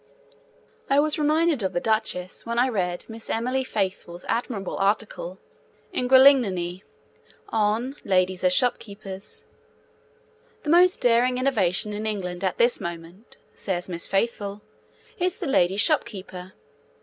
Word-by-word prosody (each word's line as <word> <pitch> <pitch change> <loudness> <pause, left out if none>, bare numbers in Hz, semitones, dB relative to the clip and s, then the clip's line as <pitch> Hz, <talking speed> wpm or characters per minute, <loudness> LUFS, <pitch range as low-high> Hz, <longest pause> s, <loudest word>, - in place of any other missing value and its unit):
I 275 +1 +4
was 305 +1 +1
reminded 310 -1 +2
of 190 - -2
the - - +1
Duchess 215 -4 -2
when 235 0 -4
I 250 +2 +3
read 180 -6 -2
Miss 225 0 -10
Emily 255 +3 0
Faithfull's 190 -6 -4
admirable 230 -5 -2
article 195 -2 -1 0.6
in 250 -8 -1
Gralignani 220 -10 +5 0.7
on 225 +5 0
'Ladies 185 -1 +1
as 185 - +4
Shopkeepers.' 200 -3 -2 1.2
'The 295 - -4
most 360 +2 +5
daring 245 +1 +3
innovation 210 -6 0
in 215 +1 -3
England 180 -4 -4
at 185 - -1
this 240 +1 +3
moment,' 170 +5 -8 0.2
says 180 -3 -3
Miss 170 -2 -4
Faithfull, 205 0 -2 0.6
'is 365 +1 0
the - - -5
lady 190 -8 +2
shopkeeper. 190 - -1
210 Hz, 125 wpm, -25 LUFS, 185-250 Hz, 1.2 s, Gralignani